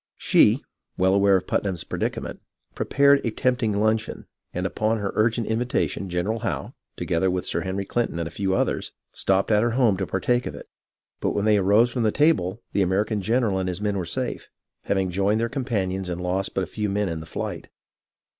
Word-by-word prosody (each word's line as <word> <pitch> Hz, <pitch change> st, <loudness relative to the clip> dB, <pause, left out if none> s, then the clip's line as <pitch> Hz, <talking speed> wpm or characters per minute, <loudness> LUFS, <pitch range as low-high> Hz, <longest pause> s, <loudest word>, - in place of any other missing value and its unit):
She, -, -, +4 dB, 0.3 s
well 95 Hz, +1 st, +3 dB
aware 100 Hz, 0 st, +5 dB
of 90 Hz, -, -5 dB
Putnam's 95 Hz, -4 st, -1 dB
predicament, -, -, -3 dB, 0.3 s
prepared 140 Hz, 0 st, +3 dB
a -, -, 0 dB
tempting 115 Hz, -2 st, 0 dB
luncheon, 110 Hz, +1 st, 0 dB, 0.3 s
and 90 Hz, +1 st, -3 dB
upon 110 Hz, +3 st, 0 dB
her 100 Hz, -2 st, -2 dB
urgent 115 Hz, +1 st, +1 dB
invitation 110 Hz, -4 st, -1 dB
Gen 90 Hz, 0 st, -1 dB
eral 110 Hz, +1 st, -2 dB
Howe, 115 Hz, -, -3 dB, 0.2 s
together 90 Hz, +3 st, 0 dB
with 90 Hz, 0 st, -1 dB
Sir -, -, -1 dB
Henry 95 Hz, +1 st, -3 dB
Clinton 120 Hz, -4 st, -1 dB
and 85 Hz, -1 st, -2 dB
a -, -, -8 dB
few 95 Hz, 0 st, -1 dB
others, -, -, -1 dB, 0.2 s
stopped 95 Hz, +2 st, +1 dB
at 105 Hz, -1 st, +4 dB
her 120 Hz, 0 st, +1 dB
home 115 Hz, -7 st, +4 dB
to 95 Hz, -1 st, -2 dB
partake 120 Hz, +6 st, 0 dB
of -, -, -6 dB
it; -, -, -10 dB, 0.5 s
but -, -, -1 dB
when 100 Hz, -, 0 dB
they 105 Hz, -1 st, +5 dB
arose 105 Hz, +5 st, +4 dB
from 120 Hz, -, -2 dB
the 110 Hz, -1 st, +2 dB
table 115 Hz, -, +2 dB
the 100 Hz, -, +2 dB
American 100 Hz, +3 st, +1 dB
general 110 Hz, -2 st, +1 dB
and 95 Hz, -1 st, -1 dB
his 90 Hz, 0 st, -4 dB
men 105 Hz, -1 st, -1 dB
were 95 Hz, -, -1 dB
safe, 85 Hz, -1 st, -4 dB, 0.4 s
having 95 Hz, -2 st, 0 dB
joined 100 Hz, +4 st, +1 dB
their 115 Hz, +1 st, 0 dB
companions 95 Hz, -8 st, -2 dB
and 90 Hz, 0 st, -3 dB
lost 90 Hz, +2 st, -2 dB
but 95 Hz, -, +1 dB
a -, -, -2 dB
few 105 Hz, +4 st, -3 dB
men 100 Hz, +1 st, 0 dB
in 80 Hz, -2 st, -3 dB
the 80 Hz, -, -9 dB
flight. -, -, -5 dB
100 Hz, 205 wpm, -24 LUFS, 95-115 Hz, 0.5 s, aware